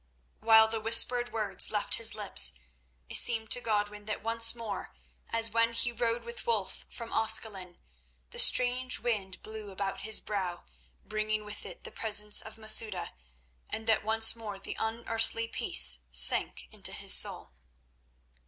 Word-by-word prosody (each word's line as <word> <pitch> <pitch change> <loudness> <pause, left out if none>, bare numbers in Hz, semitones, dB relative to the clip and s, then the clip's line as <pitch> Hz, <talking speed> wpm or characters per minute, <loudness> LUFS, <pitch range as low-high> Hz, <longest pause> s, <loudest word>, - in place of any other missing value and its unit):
While 220 0 +4
the 225 0 -6
whispered 240 +2 +3
words 215 -2 -2
left 210 -1 -2
his 230 -1 +1
lips, 130 - +3 0.5
it - - -1
seemed 225 -2 +1
to 245 - +1
Godwin 210 -2 -4
that 215 - -7
once 230 +1 +4
more, 225 -4 -9 0.3
as 230 -1 +2
when 230 +1 -1
he 240 +1 0
rode 235 0 -4
with 235 0 -10
Wulf 220 -5 -3
from 230 -1 -10
Ascalon, 215 -5 -2 0.5
the - - -5
strange 250 0 +4
wind 200 -6 -5
blew 215 -1 -9
about 195 0 -6
his 220 +2 +2
brow, 190 -4 -6 0.4
bringing 215 0 -4
with 210 0 -9
it - - -12
the - - -10
presence 210 -1 +3
of 220 0 -12
Masouda, 215 -4 +2 0.6
and 220 - -7
that 220 -2 0
once 225 +1 +4
more 215 -3 -9
the 195 - -9
unearthly 225 0 -3
peace 60 - +4
sank 65 +2 +3
into - - -6
his - - 0
soul. - - -1
220 Hz, 155 wpm, -28 LUFS, 210-230 Hz, 0.6 s, While